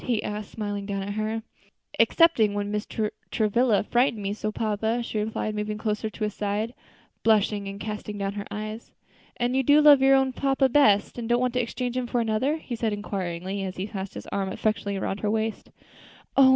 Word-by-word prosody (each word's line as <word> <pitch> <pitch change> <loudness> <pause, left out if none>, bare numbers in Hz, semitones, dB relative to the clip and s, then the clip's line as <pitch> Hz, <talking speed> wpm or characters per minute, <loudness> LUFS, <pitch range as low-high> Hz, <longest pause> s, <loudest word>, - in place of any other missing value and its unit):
he 235 -4 0
asked, 210 0 -4
smiling 205 -2 -4
down 195 -1 -2
at 205 +1 -4
her. 215 +1 -2 0.6
"Excepting 235 -12 +4
when 205 0 -2
Mr. 210 +1 -2 0.2
Travilla 220 0 +2
frightened 240 -1 +1
me 200 +1 -1
so, 215 0 -3
papa," 220 +2 -1
she 220 - -3
replied, 215 0 -2
moving 210 0 -3
closer 215 0 -2
to 215 - -6
his 210 -1 -1
side, 210 +3 -2 0.5
blushing 210 -2 +2
and 195 0 -6
casting 210 0 -5
down 200 0 -2
her 205 0 -5
eyes. 215 +2 -6 0.5
"And 245 +1 0
you 265 - +4
do 290 +3 +5
love 295 -2 +8
your 270 0 +6
own 265 -1 +2
papa 270 0 +2
best, 225 -5 +4
and 230 -1 -4
don't 240 0 +3
want 250 -1 0
to 250 - +2
exchange 245 +1 -3
him 250 -1 -1
for 240 - 0
another?" 230 +7 +1
he 255 -6 -6
said, 225 -2 -1
inquiringly, 190 -2 -3
as 185 -1 -4
he 185 - -2
passed 200 -2 -6
his - - -7
arm 195 -1 -1
affectionately 200 -2 -1
around 195 +1 -2
her 210 - -1
waist. 220 0 -2 0.7
"Oh! 270 -1 +7
215 Hz, 205 wpm, -26 LUFS, 205-240 Hz, 0.7 s, love